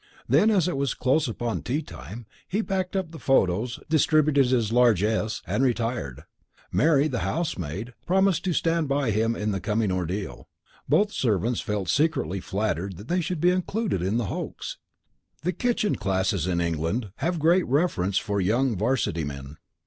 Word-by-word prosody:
Then, 215 - +4
as 195 -6 +3
it 180 - -1
was 140 -2 0
close 135 +4 +2
upon 115 -6 -3
tea 140 - -2
time, 100 - -9 0.2
he 210 +4 -1
packed 190 -2 -2
up 185 -4 -2
the 160 - -9
photos, 120 -2 +1
distributed 155 -3 +3
his 120 -4 +1
largesse, 110 -2 +2
and 135 - 0
retired. 115 - -1 0.5
Mary, 150 -2 +3
the 125 -6 -2
housemaid, 110 - -3
promised 190 -2 +3
to 180 - +1
stand 165 -1 +1
by 140 -3 +1
him 115 +2 +1
in 105 0 -1
the 95 - -2
coming 105 -1 0
ordeal. 90 -5 -4 0.4
Both 205 0 +4
the - - -15
servants 115 0 0
felt 105 -3 -3
secretly 135 - +1
flattered 95 -2 -2
that 105 +5 -11
they 180 +1 +1
should 175 0 -3
be 175 +3 +4
included 185 - -1
in 95 +5 0
the 120 - 0
hoax. - - -5 0.6
The 180 +3 0
kitchen 230 +1 0
classes 95 -3 0
in 90 -2 0
England 85 +6 -1
have 170 +5 -1
great 170 +4 +3
reverence 120 - +1
for 100 -2 0
young 115 +6 +1
'varsity 105 -6 0
men. 70 0 -7
120 Hz, 170 wpm, -25 LUFS, 95-160 Hz, 0.6 s, Then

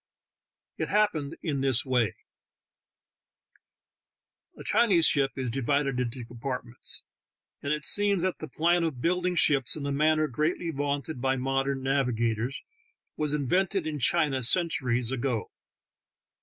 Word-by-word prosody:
It - - -2
happened 165 -8 0
in 145 -5 -1
this 135 -2 +2
way: 125 -7 +1 2.4
A - - -9
Chinese 185 -9 +4
ship 135 -2 +3
is 130 -3 -3
divided 135 +1 0
into 125 0 -3
compartments, 120 0 -4 0.6
and 140 - -3
it 150 0 -2
seems 205 -3 +4
that 185 -1 -1
the 155 - -6
plan 170 +5 +1
of 155 -6 -2
building 180 +4 0
ships 140 -6 +3
in 150 - -6
the 140 - -2
manner 155 +2 +2
greatly 155 +5 -1
vaunted 145 -1 -3
by 130 0 +1
modern 135 +1 -1
nav 135 0 +1
igators 115 +2 -2 0.5
was 150 -1 0
invented 180 +6 0
in 155 -2 -3
China 145 -2 +2
centuries 125 -4 +1
ago. 120 -5 -2
140 Hz, 130 wpm, -27 LUFS, 130-160 Hz, 2.4 s, Chinese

